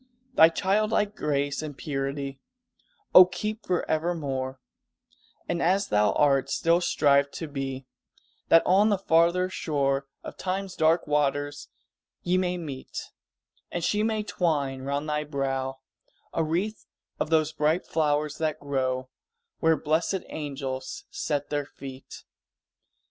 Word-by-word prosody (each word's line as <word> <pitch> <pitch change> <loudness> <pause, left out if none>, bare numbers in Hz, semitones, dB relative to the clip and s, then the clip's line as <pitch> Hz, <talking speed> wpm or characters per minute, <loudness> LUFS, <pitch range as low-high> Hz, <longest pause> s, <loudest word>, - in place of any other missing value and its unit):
Thy 160 -8 +8
childlike 210 +4 +1
grace 140 -1 -1
and 150 -3 -7
purity 140 -2 -3 0.7
O 185 - +12
keep 210 +4 -4
forevermore, 155 -7 -1 0.9
And 170 0 -1
as 195 +3 +2
thou 105 0 +3
art, 135 -2 +3
still 170 +1 +2
strive 140 -4 +3
to 160 - -5
be, 135 -2 -5 0.6
That 165 - +6
on 200 +4 +5
the 205 - +2
farther 170 0 +3
shore 140 -6 -1 0.2
Of - - -8
Time's 190 0 -3
dark 160 +2 +3
waters 145 -1 0 0.6
ye 180 +1 +1
may 180 -1 0
meet, 145 -6 -7 0.6
And 175 - -3
she 210 +5 +1
may 220 -1 0
twine 145 -9 -1
around 140 +2 -2
thy 150 -1 -1
brow 135 -2 -3 0.5
A 165 - +1
wreath 180 +8 -2 0.3
of - - -1
those 160 -1 +3
bright 155 +4 +1
flowers 150 -1 0
that 155 -1 -1
grow 130 -2 -1 0.5
Where 160 -1 +3
blessèd 165 +5 0
angels 135 -3 -5
set 145 -2 -2
their 145 -1 -1
feet! 135 -1 -10
150 Hz, 125 wpm, -27 LUFS, 140-175 Hz, 0.9 s, O